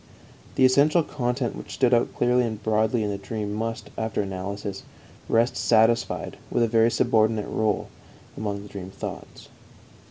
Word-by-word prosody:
The 130 - +5
essential 145 +6 +4
content 125 -3 -2
which - - -8
stood 125 -2 +3
out 120 - +2
clearly 125 +1 +3
and 110 -3 -4
broadly 110 +1 +1
in 105 - -1
the 100 - -4
dream 105 +1 -4
must, 115 +1 -4
after 110 -2 -1
analysis, 95 +1 -5 0.5
rest 115 +2 +3
satisfied 115 +1 +2
with 120 - +1
a - - +3
very 115 +1 +4
subordinate 110 -3 +2
rôle 110 -2 0 0.5
among 100 -2 -4
the - - -10
dream 95 -2 -7
thoughts. - - -8
110 Hz, 155 wpm, -25 LUFS, 105-120 Hz, 0.5 s, The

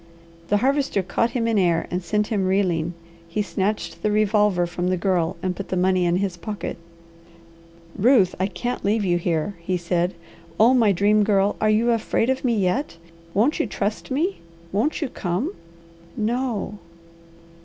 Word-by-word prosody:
The 205 - +3
Harvester 270 -4 +1
caught 230 +5 0
him 230 -1 0
in 225 -3 +2
air 170 -3 +2
and 180 +1 -2
sent 210 +4 0
him 200 -5 0
reeling. 175 -4 0 0.3
He 210 +5 -1
snatched 170 -2 -2
the 210 - +1
revolver 210 -3 +2
from 175 +1 -3
the 185 0 +1
Girl 175 -2 0
and 185 -1 -1
put 200 - -6
the 185 - -1
money 185 0 +2
in 170 - +2
his 185 -1 -1
pocket. 200 +1 -5 1.2
"Ruth, 210 -3 +4
I 190 - +1
can't 205 +6 -4
leave 210 +1 +1
you 175 -1 +2
here," 170 +3 -1
he 180 +2 -1
said. 175 +1 -1 0.4
"Oh 230 +4 +6
my 230 -5 +4
Dream 205 +3 +3
Girl! 200 -1 +2
Are 215 - +3
you 225 +3 +3
afraid 230 +2 +1
of 265 - -2
me 240 -3 +1
yet? 195 - 0 0.4
Won't 240 +12 +2
you 315 - +1
trust 210 +2 -3
me? 320 +9 -1 0.3
Won't 245 - 0
you - - -1
come?" 220 - -2 0.6
"No." 225 -2 -2
200 Hz, 170 wpm, -23 LUFS, 180-225 Hz, 1.2 s, Oh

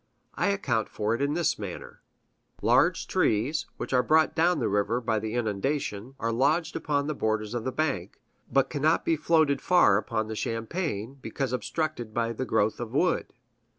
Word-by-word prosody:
I - - 0
account 135 - 0
for 105 +1 -1
it 115 - -2
in 140 +2 +1
this 160 -6 +1
manner: 100 -4 -7 0.6
Large - - +3
trees, 120 +9 +1
which - - -5
are 125 - +5
brought 155 +5 +3
down 175 +2 +3
the 120 - 0
river 105 +4 +1
by 110 -2 0
the 110 +2 -4
inundations, 120 +1 -2
are 115 - -1
lodged 145 +8 +1
upon 145 -2 0
the 155 - -1
borders 110 -3 -1
of 120 -2 -3
the 130 - -1
bank, 130 - -2 0.3
but 135 +1 +2
cannot 155 +2 +1
be 165 - +3
floated 155 -3 +2
far 175 - +5
upon 110 0 -2
the 110 - -5
champaign, 115 - -3
because 135 -2 -3
obstructed 125 -2 -3
by 115 0 0
the 130 +3 -3
growth 110 -2 +1
of 120 -2 -5
wood. 180 +5 +1
125 Hz, 180 wpm, -27 LUFS, 110-155 Hz, 0.6 s, are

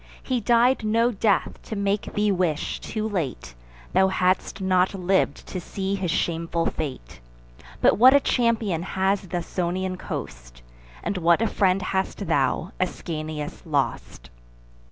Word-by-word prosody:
He 255 -2 -1
died 240 +3 +3
no 230 +3 +2
death 205 -2 0
to 220 - -6
make 200 0 -1
thee 210 0 +2
wish, 175 -5 -1
too 215 -1 -3
late, 145 - -3 0.4
Thou 190 - +5
hadst 185 +1 0
not 185 0 +2
liv'd 185 -5 0
to 185 - -5
see 195 +2 -3
his 190 -3 -2
shameful 165 0 -1
fate: 130 - -5 0.6
But - - +4
what 260 +3 +8
a - - +7
champion 230 - +1
has 190 +2 0
th' 185 -1 -7
Ausonian 180 +1 -2
coast, - - -7 0.4
And 195 - -2
what 170 +1 +4
a 225 - +1
friend 195 -3 +1
hast 190 0 -2
thou, - - 0
Ascanius, 155 -2 -4
lost!" 140 - -2
190 Hz, 140 wpm, -24 LUFS, 165-205 Hz, 0.6 s, what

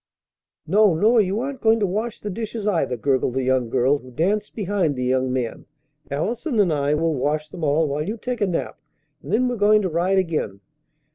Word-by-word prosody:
"No, 200 +1 +4
nor 220 +7 +4
you 195 +2 -1
aren't 275 +1 -5
going 225 0 +4
to 205 - +2
wash 215 +5 -3
the 210 - -4
dishes, 220 +1 -5
either," 165 -11 0
gurgled 130 0 0
the 135 - 0
young 130 -2 +1
girl 130 +4 +2
who 130 - -14
danced 195 - -1
behind 195 -7 0
the 125 - -3
young 130 0 +1
man; 125 -3 -3 0.4
"Allison 220 - -2
and 185 -6 +3
I 145 0 +1
will 165 +1 +1
wash 150 +3 -1
them 170 +2 -8
all 155 +2 +2
while 145 +1 -2
you 220 +3 -3
take 245 +1 -4
a 205 - +3
nap, 175 - -3 0.4
and 145 - -8
then 245 +4 +2
we're 245 -1 -2
going 210 0 +4
to 185 - 0
ride 175 +4 +1
again." 155 - -1
175 Hz, 210 wpm, -22 LUFS, 140-210 Hz, 0.4 s, No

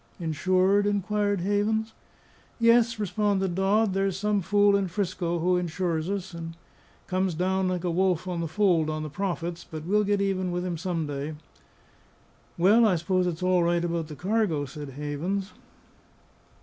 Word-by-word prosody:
"Insured?" 185 +5 +2
inquired 205 -1 0
Havens. 215 +3 0 0.7
"Yes," 230 0 +4
responded 205 -2 0
Dodd. 195 +3 +2
"There's 195 -1 0
some 210 0 0
fool 205 +2 +3
in 200 -1 +1
'Frisco 175 -2 -2
who 180 +2 +2
insures 170 -1 -2
us, 190 -2 -4
and 165 0 -7 0.5
comes 185 -2 -1
down 190 +2 0
like 180 -1 -2
a 175 - 0
wolf 185 0 +1
on 175 -2 -2
the 165 - -2
fold 170 -3 +2
on 155 0 -3
the 155 - -6
profits; 175 -1 -3
but 155 -1 -8
we'll 210 +4 +2
get 205 0 +1
even 190 -2 0
with 180 +1 -2
him 180 -2 -2
some 165 -1 -2
day." 145 +1 -4 1.2
"Well, 205 +7 +5
I 210 -5 +4
suppose 180 +2 0
it's 175 0 -3
all 185 -1 +3
right 170 0 +1
about 170 -2 -2
the 150 - -8
cargo," 185 -5 0
said 145 +1 -8
Havens. 150 +8 -3
185 Hz, 160 wpm, -26 LUFS, 170-200 Hz, 1.2 s, Well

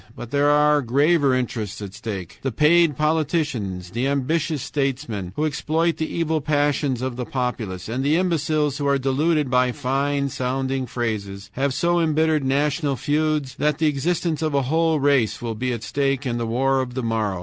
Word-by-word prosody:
But 120 -1 -8
there 145 0 +3
are 150 0 +4
graver 140 +2 +3
interests 115 -5 -3
at 100 -2 -7
stake. 100 -6 -6
"The 135 - -2
paid 150 +3 +4
politicians, 145 - -1
the 120 +5 -1
ambitious 145 +1 0
statesmen, 130 -11 -2
who 155 - 0
exploit 160 +3 0
the 160 - -3
evil 160 -2 0
passions 145 -3 0
of 130 -2 -3
the 125 - -2
populace, 115 -7 -3
and 125 +4 -2
the 145 +3 +3
imbeciles 155 -5 0
who 140 - -1
are 140 0 +3
deluded 140 +2 +1
by 125 0 +3
fine 140 +3 -1
sounding 130 +1 -2
phrases, 100 -4 -4
have 140 +2 0
so 170 +6 +1
embittered 160 -2 +2
national 140 +2 +1
feuds 150 -1 0
that 150 -1 +1
the 160 - +1
existence 155 +2 0
of 155 -2 0
a 140 - +2
whole 160 +3 +1
race 140 -5 +2
will 115 -1 -3
be 125 +4 -2
at 115 -2 -4
stake 140 +1 -1
in 120 -2 -1
the 115 - -2
war 135 +3 +1
of 125 -1 -6
the 130 - -2
morrow. 110 -5 -1
140 Hz, 185 wpm, -22 LUFS, 125-150 Hz, -, are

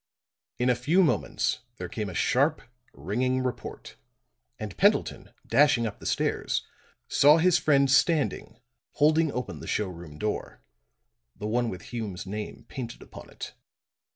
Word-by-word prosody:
In 125 +1 +2
a - - +2
few 155 +10 +3
moments 160 - 0 0.2
there 90 - -5
came 105 +3 -4
a 90 - -8
sharp, 145 - +2 0.3
ringing 130 +5 -1
report, 125 -1 -6 0.6
and 105 -4 -6
Pendleton, - - +2
dashing 120 -1 +4
up 105 - -5
the - - -6
stairs, - - 0 0.4
saw 150 +3 +6
his 175 +1 +4
friend 140 -2 +4
standing 145 -6 +2 0.3
holding 155 +1 +3
open 125 -2 -4
the - - -9
showroom 85 -7 -3
door 105 +6 -4 0.7
the 105 - -7
one 120 +2 +1
with 95 - -7
Hume's 105 -7 -4
name 105 +2 -6
painted 125 -4 -7
upon - - -12
it. - - -8
125 Hz, 140 wpm, -27 LUFS, 105-145 Hz, 0.7 s, saw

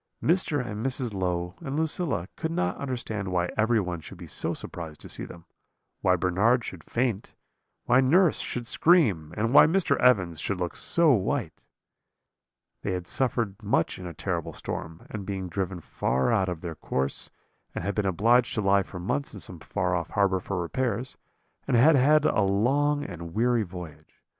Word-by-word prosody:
Mr. 155 -6 +2
and 105 -1 -5
Mrs. 130 -3 0
Low 90 -2 -2
and 140 -3 -4
Lucilla 160 - 0
could 160 - -3
not 90 - -1
understand 115 -7 -4
why 90 -1 0
everyone 110 -6 +1
should - - -11
be - - -9
so - - -2
surprised 80 -3 -7
to - - -8
see - - -4
them; 85 0 -12 0.6
why 90 - +4
Bernard 100 +7 +2
should - - -8
faint, 115 -4 -2 0.5
why 125 +2 +5
nurse 165 +6 +4
should 120 -1 -4
scream, 115 - +3
and 115 +4 0
why 150 - +9
Mr. 165 -5 +2
Evans 95 -10 +3
should 95 +3 -2
look 90 -1 -3
so 170 -3 +4
white. 110 - -1 1.1
"They 95 - -2
had 90 -1 -4
suffered 115 -3 -1
much 100 -5 0
in 90 - -7
a 85 - -7
terrible - - -3
storm, 80 0 -6
and 105 -2 -5
been 95 -1 -4
driven 95 0 -3
far 65 - 0
out 95 -5 +2
of 85 -3 -5
their 85 -2 -5
course, 70 -3 0 0.5
and 100 +3 -2
been 105 - 0
obliged 115 +7 +3
to 110 - 0
lie 100 0 +4
for 95 - -8
months 110 +9 -2
in - - -7
some 90 -2 -5
far 90 +2 -1
off 85 -2 -3
harbour 100 -2 +2
for 95 +1 -4
repairs, 120 +6 -2 0.5
and - - +3
had 150 +6 +6
had 150 +3 +4
a 110 - +2
long 135 +10 +2
and 85 - -8
weary 120 +1 +2
voyage. 85 -5 -9
100 Hz, 175 wpm, -27 LUFS, 90-125 Hz, 1.1 s, why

